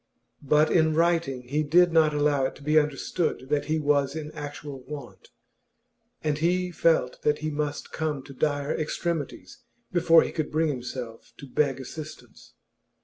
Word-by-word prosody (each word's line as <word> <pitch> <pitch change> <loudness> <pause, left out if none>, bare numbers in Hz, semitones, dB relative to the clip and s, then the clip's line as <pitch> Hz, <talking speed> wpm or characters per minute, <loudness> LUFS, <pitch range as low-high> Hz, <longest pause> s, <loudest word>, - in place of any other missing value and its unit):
But 150 +2 +3
in 160 -2 +3
writing 165 -6 +1
he 140 +5 -1
did 170 +3 +4
not 160 -2 +5
allow 145 -2 +2
it - - -3
to 145 - -14
be 155 +2 +5
understood 150 -1 -2
that 145 -1 +1
he 155 +1 0
was 145 -2 +1
in 155 -1 -5
actual 145 -2 -7
want, 145 0 -9 0.9
and 150 -1 0
he 180 +2 +1
felt 160 -7 +1
that 150 0 +2
he 155 - -1
must 145 -1 -3
come 150 -4 -2
to 140 - -11
dire 145 +1 0
extremities 165 - -3 0.3
before 165 -2 +5
he - - -4
could 155 -3 -3
bring 160 +1 +1
himself 125 -3 -6
to - - -10
beg 135 0 0
assistance. 155 +4 -10
150 Hz, 160 wpm, -26 LUFS, 140-160 Hz, 0.9 s, not